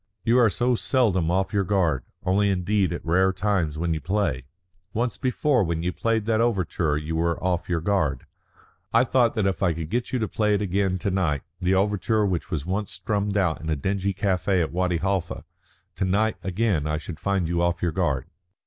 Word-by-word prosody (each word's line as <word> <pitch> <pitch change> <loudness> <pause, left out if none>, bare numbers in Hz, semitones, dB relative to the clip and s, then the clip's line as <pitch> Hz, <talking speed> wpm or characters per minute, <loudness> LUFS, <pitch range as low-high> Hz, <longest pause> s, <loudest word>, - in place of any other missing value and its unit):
"You 120 +2 +4
are 115 -3 +5
so 120 +7 +1
seldom 110 - +1
off 95 +3 0
your 100 -1 +2
guard. 85 -9 +1 0.2
Only 100 +2 +2
indeed 95 +1 +1
at 85 - -5
rare 95 +3 +3
times 95 -5 -1
when 85 +1 0
you 80 - -3
play. 95 -10 -1 0.5
Once 120 +2 -1
before 130 -1 +2
when 85 -1 -2
you 90 0 -1
played 115 -2 0
that 110 0 +2
overture 90 -9 0
you 75 +2 -4
were 85 0 +1
off 90 -1 -1
your 85 -2 0
guard. 80 -8 0 0.7
I 115 +2 +5
thought 120 -2 +2
that 110 -3 +1
if 95 -1 -1
I 90 -4 +2
could 80 0 -6
get 120 +1 -1
you 130 - 0
to 110 -3 -1
play 105 -1 +1
it 100 - -1
again 95 -1 0
to 95 +2 -2
night 85 -7 0 0.2
the 90 0 +2
overture 105 +2 +1
which 90 -4 -2
was 80 -4 -3
once 100 +3 -2
strummed 100 +2 -1
out 90 -5 +1
in 80 - -5
a 80 - +1
dingy 95 +6 -1
café 95 -1 0
at 80 - -4
Wadi 90 0 0
Halfa 95 0 -2 0.5
to - - 0
night 105 +4 +1
again 95 -4 0
I 75 0 0
should 80 +1 -7
find 100 -4 0
you 85 +1 0
off 85 0 0
your 85 - +1
guard." 75 -6 0
95 Hz, 210 wpm, -25 LUFS, 85-105 Hz, 0.7 s, are